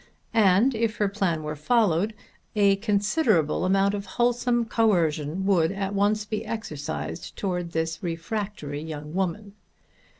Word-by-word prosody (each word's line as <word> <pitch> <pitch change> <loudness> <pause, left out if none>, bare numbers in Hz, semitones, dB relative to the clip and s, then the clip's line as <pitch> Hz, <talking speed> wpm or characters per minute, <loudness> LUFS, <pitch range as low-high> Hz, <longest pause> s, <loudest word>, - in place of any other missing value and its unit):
And, 215 +4 +4
if 225 0 0
her 205 - +2
plan 195 -6 -1
were 150 0 -4
followed, 205 +3 +2 0.4
a 200 -2 +4
considerable 205 - +1
amount 195 +1 +3
of 200 -1 -4
wholesome 240 0 +2
coercion 175 -6 +1
would 180 -4 +3
at 195 0 -3
once 205 +1 +1
be 215 0 -3
exercised 155 -11 -5
towards 180 -3 -2
this 160 0 -2
refractory 170 -4 -4
young 150 -1 -7
woman. 190 +2 -2
195 Hz, 130 wpm, -26 LUFS, 165-215 Hz, 0.4 s, And